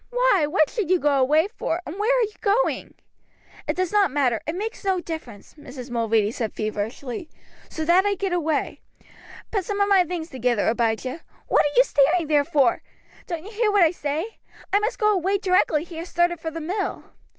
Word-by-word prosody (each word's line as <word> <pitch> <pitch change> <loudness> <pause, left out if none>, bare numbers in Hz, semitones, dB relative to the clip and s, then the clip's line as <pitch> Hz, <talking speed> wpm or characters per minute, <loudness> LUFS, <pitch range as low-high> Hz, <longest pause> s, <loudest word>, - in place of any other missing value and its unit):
Why, - - +3
what 310 -1 +2
should 420 -8 -2
you 370 -1 +4
go 295 -1 +2
away 305 +7 +3
for, 380 -6 -3
and 350 +7 -7
where 430 +4 +2
are - - +3
you 425 -1 -3
going?" 430 +4 0 0.7
"It - - 0
does 370 -1 0
not 410 -4 +3
matter; 255 -5 +1
it 315 - -2
makes 435 +5 -5
no 380 -2 +1
difference," 315 - -8
Mrs. 260 -4 -10
Mulready 225 -3 +1
said 225 -2 -4
feverishly, 220 +7 -4 0.4
"so 315 - -4
that 350 +3 +5
I 405 0 +1
get 390 -1 -2
away. 320 -4 -1 0.7
Put 400 -4 0
some 405 +2 -3
of 405 - +3
my 390 -2 +5
things 340 -1 -5
together, 245 -4 0
Abijah. 235 +6 -1 0.2
What - - +3
are 290 - -5
you - - +8
staring 325 - +2
there 295 -1 +3
for? 280 -6 +2 0.5
Don't 340 -1 -5
you 425 - -9
hear 440 -1 +1
what 405 -3 +5
I 320 - +4
say? 320 +6 -4 0.3
I 405 - +5
must 430 +3 -2
go 425 -2 +3
away 385 +1 +1
directly 365 -6 +2
he 335 -1 -10
has 335 +2 -6
started 345 -1 +1
for 325 - -4
the 325 +1 -6
mill." 380 +6 -3
335 Hz, 205 wpm, -23 LUFS, 285-395 Hz, 0.7 s, you